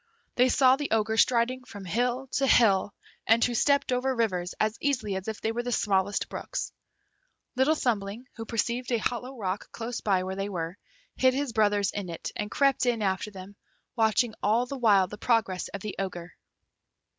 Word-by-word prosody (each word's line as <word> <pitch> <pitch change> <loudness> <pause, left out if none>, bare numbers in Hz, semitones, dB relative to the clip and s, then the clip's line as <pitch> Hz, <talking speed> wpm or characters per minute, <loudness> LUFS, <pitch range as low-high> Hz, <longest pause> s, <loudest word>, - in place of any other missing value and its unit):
They 250 +1 +4
saw 260 0 +5
the 290 0 -3
Ogre 220 0 +1
striding 245 +2 +2
from 205 -5 -10
hill 245 +7 0
to 270 +1 +1
hill, 205 -6 +4 0.4
and 225 +1 +5
who 245 - -1
stepped 280 +3 +2
over 255 +1 0
rivers 185 -7 -1
as 215 0 +1
easily 255 -9 0
as 190 +1 -5
if 220 -1 -4
they 225 - 0
were 235 +1 -2
the 245 0 -4
smallest 200 -2 +1
brooks. - - -5 0.8
Little 265 +5 +3
Thumbling, 220 -3 -2
who 225 - -6
perceived 235 +3 -2
a 235 - +3
hollow 245 +4 -3
rock 195 -2 -4
close 230 +1 -5
by 190 -3 +1
where 190 +1 -4
they 195 +1 -3
were, 170 -2 -4 0.4
hid 260 0 +4
his 280 -3 -2
brothers 205 -2 +2
in 200 -3 -5
it, 165 - -5
and 210 0 -3
crept 275 -1 +2
in 230 -3 +1
after 190 +1 -1
them, 195 0 -11 0.4
watching 225 0 +2
all 225 +4 +2
the 275 - -6
while 210 -7 +4
the 210 +3 -10
progress 220 -6 +1
of 200 - -7
the 210 0 -5
Ogre. 180 -3 -5
225 Hz, 190 wpm, -27 LUFS, 200-250 Hz, 0.8 s, saw